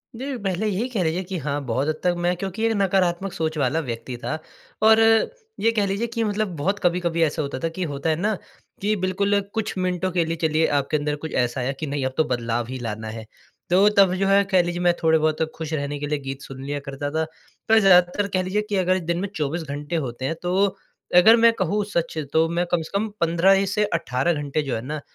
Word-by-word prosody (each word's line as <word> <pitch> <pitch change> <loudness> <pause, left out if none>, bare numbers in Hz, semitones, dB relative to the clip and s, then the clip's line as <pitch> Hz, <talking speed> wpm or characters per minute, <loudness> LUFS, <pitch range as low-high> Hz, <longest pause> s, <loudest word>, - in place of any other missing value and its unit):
दिल 265 +2 -4
पहले 195 +3 -1
यही 210 +5 -1
कह 205 -7 -1
लीजिए 165 +4 -1
कि 185 0 -5
हाँ, 145 -1 -2
बहुत 130 +5 -1
हद 155 - 0
तक 180 -1 +3
मैं 175 +1 +1
क्योंकि 195 +4 -3
एक 225 - +2
नकारात्मक 190 -1 +1
सोच 160 -1 -2
वाला 140 +3 +1
व्यक्ति 120 +1 -5
था। 155 - -2 0.4
और 220 0 +6 0.6
ये 230 +1 +3
कह 210 -3 +1
लीजिए 200 +5 -1
कि 230 0 -2
मतलब 215 0 0
बहुत 195 +8 0
कभी-कभी 175 -1 0
ऐसा 155 0 0
होता 140 -2 -4
था 165 - -1
कि 180 +3 -4
होता 140 +4 -2
है 155 - +2
ना, 210 +6 0 0.5
कि 210 +2 +1
बिल्कुल 200 +2 +1
कुछ 220 -2 -2
मिनटों 185 0 -1
के 175 -2 +1
लिए 165 +1 -2
चलिए 160 0 +2
आपके 140 +2 0
अंदर 150 0 -1
कुछ 160 +2 -7
ऐसा 125 +1 0
है 130 +3 -1
कि 155 - -3
नहीं 140 -1 -2
अब 130 - -2
तो 160 - +4
बदलाव 120 -1 -2
ही 130 - -4
लाना 110 -1 -5
है। 110 0 -7 0.4
तो 190 +4 +5
तब 195 -2 +6
जो 195 +1 0
है 200 0 +5
कह 185 - +6
लीजिए 175 0 -3
मैं 175 -1 +4
थोड़े-बहुत 155 -1 +2
खुश 160 -1 -5
रहने 145 -1 -2
के 145 - -3
लिए 150 0 -1
गीत 135 0 -6
सुन 135 0 -9
लिया 145 +1 -3
करता 140 +1 -4
था। 160 +1 0 0.5
पर 225 0 +7
ज़्यादातर 190 +1 +4
कह 185 -1 +2
लीजिए 195 +3 0
कि 205 - 0
अगर 185 0 +2
दिन 170 0 -2
में 200 - -2
24 155 +2 -2
घंटे 145 +3 -5
होते 120 +2 -5
हैं 165 +5 -1
तो 180 0 -1 0.6
अगर 220 +6 +8
मैं 230 0 +6
कहूँ 205 0 0
सच 165 -1 -1 0.2
तो 160 +1 +4
मैं 175 +1 0
कम 175 -2 +2
से 160 - -9
कम 220 +2 -1
15 170 +3 +4
इ - - 0
से 210 +2 +1
18 135 0 0
घंटे 145 0 -2
जो 135 - -2
है 110 - -3
ना 150 +1 -4
170 Hz, 240 wpm, -23 LUFS, 145-195 Hz, 0.6 s, अगर